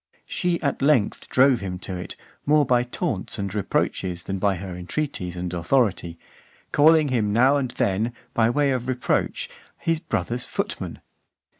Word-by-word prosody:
She 175 -1 0
at 140 - 0
length 140 -7 +2
drove 130 -1 +5
him 95 -2 -4
to 95 - -4
it, 90 - -5 0.3
more 150 0 +5
by 125 -1 +3
taunts 120 -5 -2
and 100 -2 -3
reproaches, 90 -3 -1
than 95 +1 -3
by 100 0 +2
her 90 0 -6
entreaties 90 - -3
(443) - - -5
and 90 -1 -4
authority, 90 -2 +1 0.5
calling 155 0 +5
him 110 -5 +1
now 130 +6 +4
and 130 -3 -1
then, 110 +1 0 0.2
by 115 -1 +3
way 140 +3 +2
of 125 -1 -2
reproach, 130 -1 0 0.3
his 165 -1 0
brother's 120 -6 -2
footman. - - -4
115 Hz, 160 wpm, -24 LUFS, 95-140 Hz, 0.5 s, drove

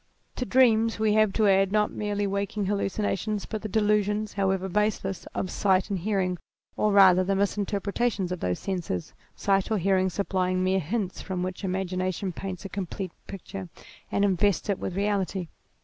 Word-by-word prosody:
To 250 - -1
dreams 230 -3 +4
we 215 -1 +2
have 215 -1 +4
to 215 -2 +3
add 195 0 +4
not 210 0 +2
merely 205 -1 -2
waking 200 +1 -2
hallucinations 205 +1 -1
but 215 -2 -5
the 215 - -5
de 220 - +2
lusions, 210 0 +1
however 190 -1 0
baseless, 195 -1 -1
of 185 - -2
sight 195 0 +2
and 195 - 0
hearing, 185 -2 0 0.4
or 210 - +2
rather 190 -2 +7
the 195 +1 0
misinterpretations 200 0 -1
of 180 - -3
those 90 0 -1
senses, 175 - -3 0.2
sight 195 -1 +1
or 220 - +1
hearing 190 0 +2
supplying 185 -1 0
mere 190 +1 +2
hints 190 +3 -3
from 185 -2 -3
which 185 +2 -5
ima 190 0 -1
gination 185 +1 -2
paints 190 +2 -6
a - - -2
complete 190 -1 -4 0.2
picture 195 -1 -7 0.4
and 200 - +2
invests 200 +1 +1
it 195 - 0
with 180 - -4
realit} 200 -1 0
r 180 - -4
195 Hz, 180 wpm, -27 LUFS, 185-210 Hz, 0.4 s, rather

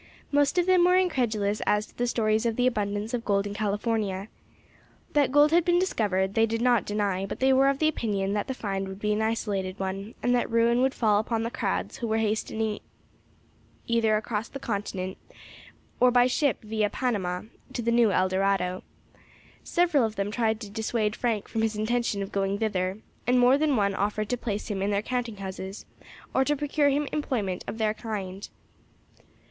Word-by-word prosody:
Most 290 +3 +2
of 350 - +3
them 365 -1 +5
were 360 +1 +5
incredulous 230 - +1
as 210 0 +2
to - - -22
the 245 - -1
stories 220 -1 +1
of 230 - -1
the 245 - +1
abundance 210 -2 -1
of 240 -2 -1
gold 200 -2 +1
in 205 - -4
California. 205 -1 -1 0.8
That 285 -3 +3
gold 290 +2 +5
had 340 +1 +4
been 350 0 +3
discovered 200 - 0
they 225 +1 +3
did 225 +1 -2
not 240 -1 +3
deny; 200 -2 -1
but - - -6
they 265 0 +4
were 270 +1 +5
of 275 +2 -1
opinion 205 -10 0
that 205 - -1
the 265 - -3
find 195 -4 -3
would 190 0 -7
be 210 0 0
an 210 - 0
isolated 205 -4 -1
one, 195 +3 -4
and 245 - +3
that 245 - +1
ruin 230 +1 +3
would 265 0 +1
fall 210 -3 +3
upon 225 +1 -1
the 230 - -3
crowds - - -2
who 235 - -3
were 220 0 +1
hastening 220 0 -1 1.1
either 225 -2 +2
across 215 0 -3
the - - -7
continent, 200 -6 -4 0.8
or 250 - +6
by 245 0 +5
ship 255 0 +1
via 215 -1 0
Panama, 190 -9 -2 0.3
to 240 - -4
the 235 - +1
new 235 -2 +4
Eldorado. 185 0 +1 0.8
Several 340 -6 +2
of 220 -1 -1
them 200 0 -2
tried 220 -1 0
to 210 - -7
dissuade 220 0 -1
Frank 225 -4 -1
from 225 - -2
his 225 -1 0
intention 215 -1 0
of 195 - -7
going 195 0 0
thither, 195 -3 -1 0.3
and 250 0 +4
more 245 +2 +6
than 295 -1 +2
one 200 -3 +2
offered 210 +2 -1
to 245 - +1
place 215 -4 -4
him 200 -3 -3
in 200 - 0
their 200 0 0
counting 240 -3 -3
houses, 190 0 -7 0.5
or 265 - +3
to 295 +2 +1
procure 290 0 +1
him 285 +1 0
employment 220 -11 -2
of - - -4
other 220 -1 0
kind. 200 -4 -6
220 Hz, 195 wpm, -27 LUFS, 200-245 Hz, 1.1 s, or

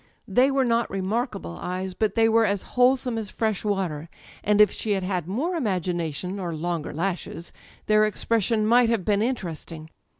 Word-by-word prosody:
They 255 +2 +4
were 270 -1 +2
not 235 -1 +1
remarkable 195 - -3
eyes, 185 +1 -3
but 210 +1 -1
they 225 -1 +4
were 225 0 +4
as 200 -3 0
wholesome 250 -1 +3
as 210 -2 -5
fresh 220 -3 -1
water, 180 -7 -2 0.3
and 210 0 +2
if 210 -2 +7
she 215 - -2
had 190 -2 -1
had 180 -3 -2
more 270 - -1
imagination 180 - -2
â€" - - -5
or 170 -3 -3
longer 165 -1 -3
lashes 170 0 -4 0.4
â€" 215 - +2
^their 215 0 +5
expression 215 0 0
might 235 +1 +5
have 225 -6 0
been 205 -1 +2
interesting. 165 -9 -4
205 Hz, 180 wpm, -25 LUFS, 180-230 Hz, 0.4 s, if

